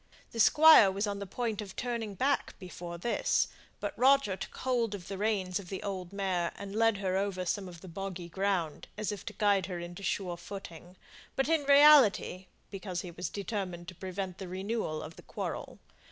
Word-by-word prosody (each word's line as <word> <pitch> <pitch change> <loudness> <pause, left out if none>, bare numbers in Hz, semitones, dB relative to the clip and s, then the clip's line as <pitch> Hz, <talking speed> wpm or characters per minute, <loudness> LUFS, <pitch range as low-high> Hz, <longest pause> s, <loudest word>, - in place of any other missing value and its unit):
The 230 - -6
Squire 300 -2 +8
was 195 +2 -1
on 200 -1 -3
the 200 - -5
point 225 +1 -2
of 195 -3 -9
turning 230 -4 -3
back 275 +8 0
before 175 -2 -8
this, 235 +8 +1 0.3
but - - -4
Roger 270 -6 +4
took - - -8
hold 235 -5 0
of 180 -4 -9
the 195 - -5
reins 200 -3 0
of 185 -3 -10
the 190 - -5
old 185 -3 -4
mare, 190 -4 -1
and 200 0 -7
led 225 -1 +3
her 190 -1 0
over 195 -2 -1
some 195 +2 -1
of 170 -2 -12
the - - -11
boggy 185 0 -6
ground, 180 -4 -1
as 215 -1 -2
if 205 -3 -6
to - - -4
guide 200 -3 +2
her 180 -2 -4
into 175 +2 -7
sure 185 -3 -2
footing, 175 -1 -9 0.4
but, 270 - +1
in 320 -3 +2
reality, 280 -10 +6 0.2
because 190 -3 -4
he 180 - -8
was 175 +1 -4
determined 190 -4 -4
to - - -9
prevent 185 0 -5
the 190 - -6
renewal 190 -3 -3
of 160 +2 -10
the - - -10
quarrel. - - -5
195 Hz, 195 wpm, -31 LUFS, 180-215 Hz, 0.4 s, Squire